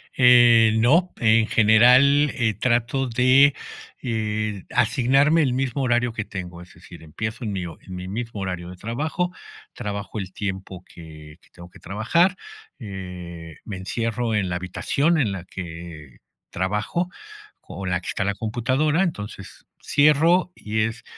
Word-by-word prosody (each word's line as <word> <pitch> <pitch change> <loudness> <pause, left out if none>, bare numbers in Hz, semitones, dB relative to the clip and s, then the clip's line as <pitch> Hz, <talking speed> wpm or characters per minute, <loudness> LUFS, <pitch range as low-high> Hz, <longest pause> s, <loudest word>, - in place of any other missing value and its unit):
Eh, 120 -3 +6
no. 160 +11 +3
En 115 -1 +3
general, 125 +7 +5
eh, 115 -5 +1
trato 125 +4 0
de, 130 +4 +4 0.5
eh, 110 -4 -2
asignarme 135 +7 +3
el 130 -5 +1
mismo 135 +1 -1
horario 120 -1 +1
que 110 -2 -3
tengo. 90 -4 -8
Es 90 +2 -15
decir, 85 - -14
empiezo 110 - -6
en 105 - -3
mi 95 -2 -3
en 90 +2 -9
mi 90 0 -7
mismo 110 +1 -5
horario 90 -2 -4
de 90 - -9
trabajo, 155 - -3 0.4
trabajo 100 +1 -5
el 95 -2 -6
tiempo 95 -3 -6
que 75 -2 -13
que - - -26
tengo 85 0 -14
que - - -16
trabajar. 170 - +1 0.4
Eh, 90 - -8
me 100 - -6
encierro 115 +4 -2
en 100 -3 0
la 90 - -2
habitación 140 - 0
en 115 -9 +1
la 95 -2 -6
que 80 -7 -9 0.3
trabajo, 105 - -2 0.5
o, 95 - -8
la 90 -1 0
que - - -11
está 95 - -2
la 100 +1 -1
computadora, 130 - 0
entonces 105 - -6 0.2
cierro, 160 +5 +3
y 110 +1 -2
es 115 +2 -3
110 Hz, 150 wpm, -23 LUFS, 95-130 Hz, 0.5 s, Eh